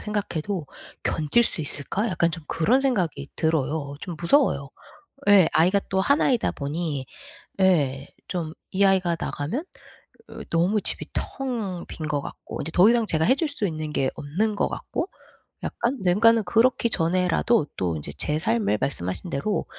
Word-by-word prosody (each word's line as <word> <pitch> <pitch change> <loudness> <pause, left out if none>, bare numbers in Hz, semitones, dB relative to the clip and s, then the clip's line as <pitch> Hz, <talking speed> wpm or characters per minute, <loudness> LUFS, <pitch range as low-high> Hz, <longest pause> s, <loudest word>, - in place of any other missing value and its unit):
생각해도 200 -5 -3 0.4
'견딜 160 +9 +2
수 175 - 0
있을까?' 155 +9 0
약간 170 -3 +1
좀 165 -2 -7
그런 230 +11 +2
생각이 175 - 0
들어요. 150 -2 0
좀 175 -4 -6
무서워요. 170 - +2 0.6
예 195 -4 +7
아이가 185 +5 +4
또 190 0 +1
하나이다 260 +1 +2
보니 145 -2 -3 0.5
예 145 -7 +2 0.2
좀 165 -3 -3 0.2
이 200 +1 +2
아이가 185 -3 +3
나가면 160 - -3 0.7
어 - - -10
너무 180 +6 +2
집이 - - -1
텅 225 -10 -3
빈 155 - -6
것 145 -2 0
같고 - - -8
이제 160 - -4
더 185 +5 +7
이상 235 -2 +2
제가 160 -3 +1
해 260 - +5
줄 320 +1 -1
수 250 -8 -2
있는 155 -2 -4
게 135 -2 +1
없는 205 +9 -1
것 - - +1
같고 360 - -4 0.6
약간. 240 +3 -1
네 180 - +3
그러니까는 230 0 +5
그렇기 235 +5 +2
전에라도 180 +1 +2
또 85 -3 -1
이제 75 -1 -5
제 150 +1 0
삶을 220 - +1
말씀하신 95 - -3
대로 200 +10 -1
175 Hz, 305 characters per minute, -24 LUFS, 155-215 Hz, 0.7 s, 예